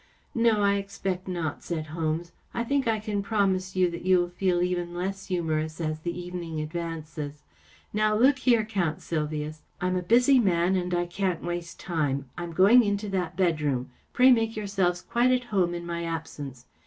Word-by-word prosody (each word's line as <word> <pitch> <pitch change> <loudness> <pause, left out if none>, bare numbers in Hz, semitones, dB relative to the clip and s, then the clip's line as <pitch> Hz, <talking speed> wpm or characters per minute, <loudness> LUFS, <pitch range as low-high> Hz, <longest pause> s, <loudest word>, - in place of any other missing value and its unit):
" - - -39
No, 230 -3 +3
I 200 0 +3
expect 195 -2 -4
not," 170 -5 -3
said 160 -3 -3
Holmes. 165 +1 -2
" - - -36
I 235 - 0
think 275 +1 0
I 225 -1 +2
can 210 -1 -2
promise 195 -3 0
you 185 -1 +4
that 170 - -6
you 185 0 +5
will 175 0 +1
feel 175 0 +1
even 175 -1 -2
less 195 +2 -3
humorous 160 -3 -1
as 155 -1 -2
the 170 +2 -4
evening 175 -3 -5
advances. 155 -2 -5 0.5
Now, 215 0 +2
look 265 +5 +4
here, 235 -4 +3
Count 185 -8 -1
Sylvius. 155 -1 -3 0.2
I'm 185 0 0
a 180 - 0
busy 245 +8 +5
man 185 -3 +2
and 180 -1 -1
I 175 0 +1
can't 180 -1 -2
waste 175 0 -4
time. 145 -6 -1
I'm 175 -1 -5
going 205 +8 +7
into 205 0 -1
that 180 -3 -2
bedroom. 150 -9 0 0.2
Pray 255 +1 +6
make 225 -2 +2
yourselves 195 -4 0
quite 240 +2 +2
at 255 0 +2
home 175 -3 +2
in 170 0 -5
my 170 0 -3
absence. 145 -6 -6
180 Hz, 190 wpm, -27 LUFS, 165-200 Hz, 0.5 s, going